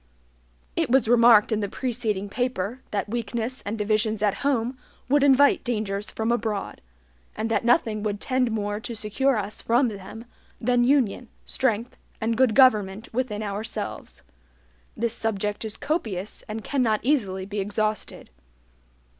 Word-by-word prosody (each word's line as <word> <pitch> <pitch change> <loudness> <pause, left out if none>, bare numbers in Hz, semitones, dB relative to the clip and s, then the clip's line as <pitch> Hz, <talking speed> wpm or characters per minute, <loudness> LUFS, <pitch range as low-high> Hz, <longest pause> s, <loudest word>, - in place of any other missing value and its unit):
It - - 0
was 255 -2 +4
remarked 230 -2 +6
in 215 - +1
the 205 -2 -2
preceding 220 -5 -2
paper, 245 0 -2
that 205 - -2
weakness 235 +2 -3
and 215 +2 -2
divisions 215 0 0
at 205 -2 +3
home 255 -3 0 0.3
would 285 +1 +4
invite 280 0 +5
dangers 210 -4 -2
from 220 +1 -1
abroad; 220 -4 -2 0.5
and 225 +1 -2
that 225 - +1
nothing 230 -3 +2
would 205 -1 -2
tend 255 0 +1
more 205 -1 -2
to 230 +1 -6
secure 225 +5 +1
us 210 0 -4
from 240 +2 +2
them 210 +2 -9 0.3
than 245 +1 +2
union, 250 -3 +2 0.2
strength, 235 -2 -1 0.2
and 225 +1 0
good 245 -2 +3
government 215 -6 +3
within 220 -4 -2
ourselves. 210 +2 -5 0.7
This 230 0 0
subject 210 -2 -2
is 220 -1 -4
copious 220 - -3
and 215 0 -5
cannot 240 -6 +1
easily 205 -9 0
be 205 +1 -4
exhausted. 210 - -2
220 Hz, 145 wpm, -25 LUFS, 210-245 Hz, 0.7 s, remarked